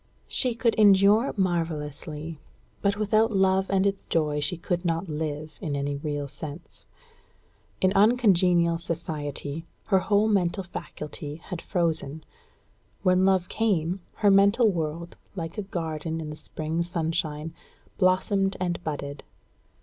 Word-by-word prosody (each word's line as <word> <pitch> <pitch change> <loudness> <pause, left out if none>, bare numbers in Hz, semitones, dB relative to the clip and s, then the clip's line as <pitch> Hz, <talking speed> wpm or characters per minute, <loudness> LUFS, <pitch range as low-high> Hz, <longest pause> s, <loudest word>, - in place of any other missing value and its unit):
She 250 -3 +3
could 230 -1 +2
endure 205 +4 +6
marvellously; 160 -3 -2 0.4
but 200 0 +1
without 215 +2 +2
love 190 -1 +2
and 195 0 +2
its 200 0 0
joy 150 -2 0
she 150 +4 0
could 175 +1 -2
not 170 +1 -1
live, 150 0 -4
in 155 -7 -2
any 140 0 -2
real 145 -1 -3
sense. 150 +3 -9 0.9
In 185 0 +3
uncongenial 185 -7 +4
society, 155 -1 -3 0.2
her 190 -3 +5
whole 205 +3 +2
mental 195 -2 +1
faculty 150 -4 -7
had 165 +1 -7
frozen; 160 -4 -1 0.8
when 185 0 +4
love 190 -2 +3
came, 190 -5 0 0.2
her 205 -2 +4
mental 200 +3 +5
world, 165 0 -4 0.2
like 165 +3 -5
a 200 -1 -6
garden 160 -2 -3
in 155 -1 -5
the - - -6
spring 155 +2 -3
sunshine, 165 -2 -2 0.5
blossomed 195 +1 +2
and 175 -1 -2
budded. 145 -2 -5
170 Hz, 130 wpm, -26 LUFS, 155-195 Hz, 0.9 s, endure